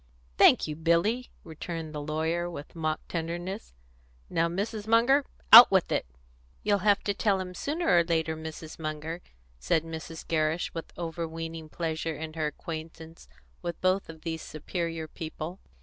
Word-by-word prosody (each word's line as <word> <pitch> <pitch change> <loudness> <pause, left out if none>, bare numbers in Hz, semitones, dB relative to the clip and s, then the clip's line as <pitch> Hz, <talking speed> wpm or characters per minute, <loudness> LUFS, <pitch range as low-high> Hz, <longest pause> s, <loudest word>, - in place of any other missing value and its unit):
"Thank - - +6
you, 150 - -4
Billy," 170 +10 +1
returned 160 0 -6
the 150 - -4
lawyer, 160 +3 -1
with 155 -2 -9
mock 155 -1 -2
tenderness. 175 - -4 0.6
"Now, 165 +1 +2
Mrs. 205 +5 -3
Munger, 240 +5 +5 0.3
out 235 +2 +14
with 190 -2 +2
it!" - - 0 0.6
"You'll 205 -1 +2
have 205 +1 +3
to 205 - 0
tell 200 -2 +1
him 180 -1 -5
sooner 315 - -2
or - - +4
later, 160 -1 0
Mrs. 160 0 -8
Munger!" 155 +2 -4 0.4
said 65 - +1
Mrs. 165 0 -7
Gerrish, 160 +1 0
with 165 - -6
overweening 165 -1 -5
pleasure 160 -1 -3
in 155 +1 -6
her 155 -1 -1
acquaintance 160 - -8 0.3
with 170 -1 -4
both 185 0 +1
of 160 -1 -10
these 160 -1 -4
superior 165 +1 -4
people. 165 +2 -6
165 Hz, 150 wpm, -28 LUFS, 160-180 Hz, 0.6 s, out